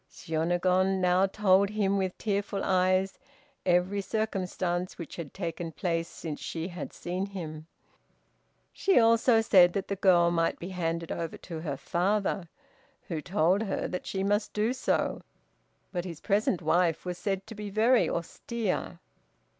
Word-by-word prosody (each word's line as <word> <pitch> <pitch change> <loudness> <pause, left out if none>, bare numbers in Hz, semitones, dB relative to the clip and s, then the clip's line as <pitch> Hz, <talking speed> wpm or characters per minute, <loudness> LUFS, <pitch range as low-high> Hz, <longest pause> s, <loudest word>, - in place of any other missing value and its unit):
Shiônagon 180 +4 +1
now 180 +1 +3
told 195 -1 +3
him 205 -2 +1
with 190 -2 -1
tearful 200 -1 -2
eyes 185 0 +2 0.5
every 180 +3 +2
circumstance 185 -4 -2
which 170 -4 -7
had 165 -5 -6
taken 170 -2 -4
place 165 0 -1
since 155 -2 -6
she 165 +2 -4
had 175 -4 -6
seen 180 +3 -3
him. 160 -5 -7 1.1
She 390 - +2
also 230 0 +5
said 180 -5 +6
that 200 - -3
the 200 - 0
girl 175 -3 +4
might 165 -1 +1
be 175 - -7
handed 165 -2 -2
over 165 -1 -4
to 165 -3 -5
her 150 -4 -4
father, 190 +1 0 0.6
who 160 -3 -2
told 180 +3 +2
her 200 -3 -2
that 180 - -5
she 190 -1 -2
must 205 +2 0
do 215 +4 +1
so, 260 - 0 0.7
but 175 -2 -2
his 170 -4 -7
present 200 -4 +1
wife 170 +1 +2
was 180 -1 -4
said 195 -1 -2
to 225 - -9
be 210 -1 -6
very 225 +5 +3
austere. 185 +2 -3
185 Hz, 150 wpm, -29 LUFS, 170-200 Hz, 1.1 s, said